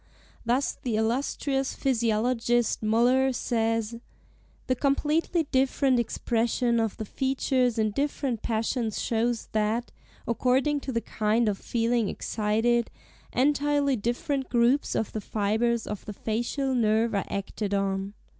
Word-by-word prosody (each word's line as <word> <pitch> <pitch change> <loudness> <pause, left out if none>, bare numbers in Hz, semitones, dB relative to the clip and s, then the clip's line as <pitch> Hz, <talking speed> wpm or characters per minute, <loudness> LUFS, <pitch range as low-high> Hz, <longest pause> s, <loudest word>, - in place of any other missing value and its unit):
Thus 245 +4 0
the 240 -4 -1
illustrious 270 +4 -1
physiologist 240 -1 +1
Müller, 245 +4 +3
says, 225 -1 -1 0.7
"The 255 - +1
completely 300 +5 +1
different 265 -1 +2
expression 235 +1 0
of 225 -2 -1
the 220 - -4
features 260 0 0
in 215 -1 +1
different 275 -2 -2
passions 225 0 -1
shows 230 0 -1
that, 220 +3 0 0.4
according 260 +5 +2
to 270 - -5
the 230 -2 -1
kind 220 +2 0
of 200 -2 0
feeling 230 -2 0
excited, 225 +2 0 0.4
entirely 285 +1 +2
different 250 +5 -2
groups 245 +4 +2
of 220 - -1
the 215 - -4
fibres 220 +3 0
of 210 -1 -5
the 210 - -6
facial 240 +6 -2
nerve 225 -1 +2
are 200 - 0
acted 200 +1 -3
on. 195 0 -1
235 Hz, 125 wpm, -27 LUFS, 220-260 Hz, 0.7 s, Müller